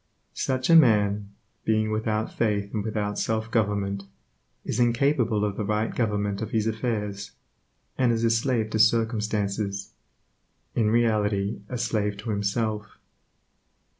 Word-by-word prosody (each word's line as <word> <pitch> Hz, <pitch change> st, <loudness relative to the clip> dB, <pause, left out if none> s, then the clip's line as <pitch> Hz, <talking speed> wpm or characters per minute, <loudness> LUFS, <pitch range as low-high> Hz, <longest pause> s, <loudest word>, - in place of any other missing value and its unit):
Such 130 Hz, +3 st, 0 dB
a -, -, +8 dB
man, 105 Hz, -8 st, +4 dB, 0.3 s
being 110 Hz, 0 st, +1 dB
without 110 Hz, 0 st, -1 dB
faith 105 Hz, -3 st, -1 dB
and 105 Hz, -2 st, -1 dB
without 105 Hz, -1 st, -2 dB
self 110 Hz, 0 st, -1 dB
government, 100 Hz, -3 st, 0 dB, 0.6 s
is -, -, -2 dB
incapable 120 Hz, -3 st, +2 dB
of 100 Hz, -1 st, -3 dB
the -, -, -1 dB
right 105 Hz, +2 st, -1 dB
government 105 Hz, -3 st, -1 dB
of 110 Hz, -, -3 dB
his 110 Hz, -2 st, 0 dB
affairs, 105 Hz, -3 st, -3 dB, 0.7 s
and 125 Hz, -2 st, +4 dB
is 115 Hz, 0 st, 0 dB
a 115 Hz, -, +3 dB
slave 115 Hz, -1 st, +1 dB
to 110 Hz, -, 0 dB
circumstances; 105 Hz, -3 st, +1 dB, 0.8 s
in 110 Hz, -3 st, +2 dB
reality 105 Hz, -3 st, +1 dB
a 125 Hz, -, -3 dB
slave 110 Hz, -3 st, -1 dB
to 110 Hz, +2 st, -4 dB
himself. 105 Hz, +1 st, -2 dB
110 Hz, 135 wpm, -26 LUFS, 105-115 Hz, 0.8 s, a